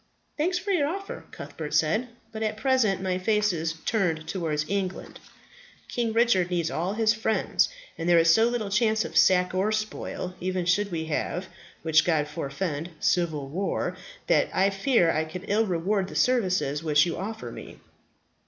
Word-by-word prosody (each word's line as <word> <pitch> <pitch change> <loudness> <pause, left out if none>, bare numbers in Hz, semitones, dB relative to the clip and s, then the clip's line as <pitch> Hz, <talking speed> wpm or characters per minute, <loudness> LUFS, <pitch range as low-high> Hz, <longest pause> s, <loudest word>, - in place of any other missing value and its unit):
"Thanks 355 +4 0
for 390 +2 -3
your 310 -7 +2
offer," 390 +5 -5
Cuthbert 150 -2 -7
replied; 165 +11 +2 0.2
"but 220 - -6
at 215 -1 -1
present 220 -6 +2
my 185 -1 -1
face 210 0 +2
is 165 0 -2
turned 165 -8 0
towards 160 -4 -2
England. 190 -2 -3 0.7
King 235 -2 -1
Richard 220 -6 +3
needs 170 -2 -1
all 175 +5 -1
his 220 0 +3
friends; 220 -1 +1 0.3
and 165 +1 -1
there 175 - +6
is 165 0 +6
so 225 +4 +4
little 225 -4 -3
chance 220 +1 +2
of - - -8
sack 180 -1 +4
or 190 +3 +1
spoil, 215 -4 -3
even 185 -1 -2
should 200 +4 +2
we 160 -2 -2
have 165 +3 -2 0.4
which 160 0 +4
God 155 -4 +1
forfend 150 +2 -4
civil 160 -6 0
war, 185 +8 -2 0.3
that - - +3
I 195 +2 +2
fear 195 -3 +3
I 155 - 0
could 175 +4 -8
ill 215 +2 +2
reward 185 +2 0
the - - -10
services 185 - +1
which 150 -1 +4
you 170 - -2
offer 220 +5 -5
me." - - -10
185 Hz, 170 wpm, -26 LUFS, 165-220 Hz, 0.7 s, there